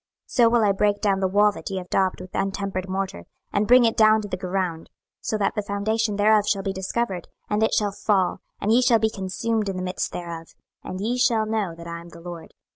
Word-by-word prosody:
26:013:014 - - -19
So 235 -2 +6
will 235 -1 +3
I 205 - +4
break 205 +1 +1
down 200 -2 +1
the 190 - +1
wall 205 +2 +4
that 205 - -8
ye 195 - -3
have 180 -1 -7
daubed 190 -1 +1
with 185 0 -11
untempered 195 -1 -2
morter, 190 - -3 0.3
and 205 +1 +1
bring 250 0 +7
it 225 - +2
down 215 0 +5
to - - -5
the 195 - -3
ground, 180 -3 -3 0.3
so 215 - -2
that 200 -2 0
the 210 - -1
foundation 210 +2 -1
thereof 210 0 +4
shall 195 -2 +1
be 195 -1 -2
discovered, 190 -1 -3 0.2
and 210 +1 +1
it 220 - +3
shall 205 -1 +1
fall, 195 -2 +1 0.2
and 210 - 0
ye 245 - +5
shall 245 -2 +5
be 220 0 +1
consumed 210 +2 -2
in 195 - -3
the 185 - -3
midst 180 0 -3
thereof: 170 -2 -7 0.3
and 185 +1 -6
ye 240 +4 -1
shall 230 -3 +3
know 215 -6 -2
that 170 0 -11
I 170 0 -6
am 170 - -13
the 170 - -13
LORD. 170 -1 -9
200 Hz, 245 wpm, -24 LUFS, 185-215 Hz, 0.3 s, bring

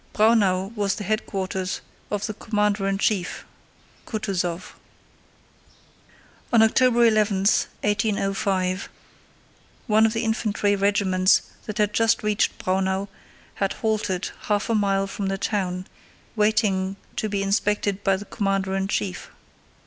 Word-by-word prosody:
Braunau 205 -3 +3
was 205 -2 0
the 210 - -5
headquarters 190 -3 -2 0.3
of 205 -1 -2
the 215 - -3
commander 210 -2 0
in 195 0 0
chief, 195 -3 -1 0.6
Kutúzov. 185 -5 -3 1.8
On 230 -2 +6
October 240 +1 +4
11, 215 -3 +3
1805, 195 -2 0 1.0
one 220 -1 +4
of 220 - -2
the 225 - -1
infantry 215 -2 +1
regiments 195 -1 +3 0.2
that 210 -1 -5
had 210 -1 +1
just 225 0 +2
reached 210 -1 +1
Braunau 190 +1 -1 0.4
had 195 -1 -1
halted 210 -4 -1
half 210 +2 0
a - - +2
mile 195 -2 +2
from 195 0 -4
the 195 0 -1
town, 185 -3 -2 0.5
waiting 210 -3 +1 0.2
to 215 - -1
be 200 -1 -1
inspected 200 0 0
by 195 -1 +3
the 205 - -8
commander 195 -3 -1
in 195 0 -1
chief. 100 - -3
200 Hz, 125 wpm, -24 LUFS, 190-215 Hz, 1.8 s, On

